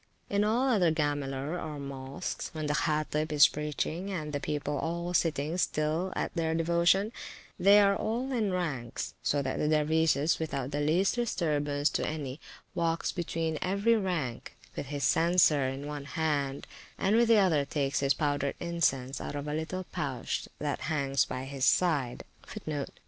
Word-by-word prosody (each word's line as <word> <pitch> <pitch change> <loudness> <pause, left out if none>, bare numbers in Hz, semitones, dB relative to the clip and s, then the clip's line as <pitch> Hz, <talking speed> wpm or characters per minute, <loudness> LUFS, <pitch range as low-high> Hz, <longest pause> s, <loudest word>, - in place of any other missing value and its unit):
In 200 +1 +2
all 235 +5 +2
other 195 -10 +3
Gamiler 145 +1 -2
or 155 -2 -5
Mosques, 140 +3 -5
when 155 -1 -3
the 150 - 0
Hattib 155 0 0
is 150 -1 +7
preaching, 150 +5 -3
and 155 -6 -4
the 145 - -1
people 145 0 -2
all 170 +2 -2
sitting 160 0 0
still 160 +4 0
at - - -2
their 160 -2 0
devotion, 170 +5 +3 0.5
they 200 +3 +7
are 200 -1 +5
all 240 +7 -2
in 220 -6 0
ranks, 150 -10 -3
so 145 -1 +1
that 130 - -2
the 150 - +1
dervise, 155 0 +2
without 140 -4 -3
the 145 - -1
least 170 +6 +2
disturbance 150 -11 0
to - - -1
any, 145 -2 -4 0.3
walks 170 -2 0
between 165 -3 -2
every 200 +5 +2
rank, 175 - -2 0.2
with - - -4
his 145 0 -4
censer 165 -5 +4
in 135 +2 -4
one 145 -1 -5
hand, 145 -3 -1 0.3
and 200 +3 +2
with 235 +1 +4
the 225 -1 +6
other 175 -8 +4
takes 140 0 -1
his 140 0 +2
powdered 145 -2 0
incense 140 -6 0
out - - -5
of 145 0 -4
a 150 - -2
little 160 +4 -3
pouch 140 -7 -3
that 145 -2 -2
hangs 140 -3 +1
by 130 0 -5
his 135 0 -5
side. 145 -7 +2
155 Hz, 165 wpm, -30 LUFS, 145-175 Hz, 0.5 s, is